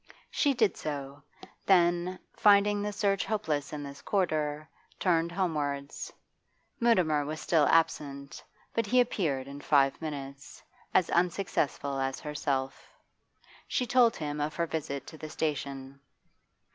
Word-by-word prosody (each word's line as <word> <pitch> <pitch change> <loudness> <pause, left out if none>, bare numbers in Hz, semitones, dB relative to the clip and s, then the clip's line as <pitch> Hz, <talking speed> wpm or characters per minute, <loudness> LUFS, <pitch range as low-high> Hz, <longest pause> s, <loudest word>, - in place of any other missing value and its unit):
She 285 -3 +2
did 220 -6 +2
so; 140 -1 -5 0.5
then, 175 -1 +3 0.2
finding 205 0 +4
the 210 0 -2
search 195 -1 +1
hopeless 160 -9 -2
in 150 -1 -5
this 140 0 -9
quarter, 155 -6 -1 0.3
turned 170 -2 +2
homewards. 145 -6 -2 0.7
Mutimer 180 -11 +3
was 155 +2 -5
still 155 -1 +3
absent, 140 -4 0 0.3
but 230 -2 0
he 250 +4 +4
appeared 155 - 0
in 140 +1 -8
five 140 0 +3
minutes; 140 -3 -7 0.3
as 185 - +2
unsuccessful 170 -6 0
as 135 0 -2
herself. 135 -3 -3 0.8
She 250 - 0
told 240 -1 +4
him 150 -1 -4
of 150 +2 -2
her 170 - 0
visit 145 -4 -4
to 160 - -11
the 155 - -7
station. 140 -3 -4
155 Hz, 130 wpm, -29 LUFS, 140-185 Hz, 0.8 s, finding